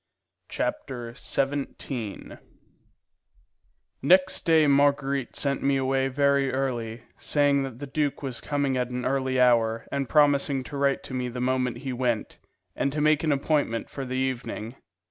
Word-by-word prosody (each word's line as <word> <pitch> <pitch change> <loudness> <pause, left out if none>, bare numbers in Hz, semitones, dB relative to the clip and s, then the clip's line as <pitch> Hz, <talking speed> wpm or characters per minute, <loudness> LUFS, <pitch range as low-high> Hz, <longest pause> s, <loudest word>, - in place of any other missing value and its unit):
Chapter 120 -3 -4
XVII 135 -4 -3 1.6
Next 185 +6 +3
day 160 -2 +5
Marguerite 140 -2 +2
sent 140 -1 -1
me 140 0 +2
away 135 0 +1
very 140 0 +2
early, 120 -4 -3
saying 145 -1 +2
that 135 -4 -5
the 145 - -6
duke 145 +1 -2
was 130 -3 -4
coming 140 -2 -1
at 125 -1 -1
an 125 0 -4
early 130 -1 0
hour, 115 -2 +3
and 140 -3 -2
promising 140 -2 +3
to 145 - -9
write 140 0 +1
to - - -8
me 125 -1 -2
the 125 +1 -6
moment 125 -1 0
he 130 - -2
went, 120 -3 -2 0.4
and 140 - 0
to 150 - -3
make 150 +1 +3
an 155 - +2
appointment 140 -4 0
for 140 - -5
the 130 0 -4
evening. 130 -3 -3
135 Hz, 150 wpm, -26 LUFS, 125-140 Hz, 1.6 s, day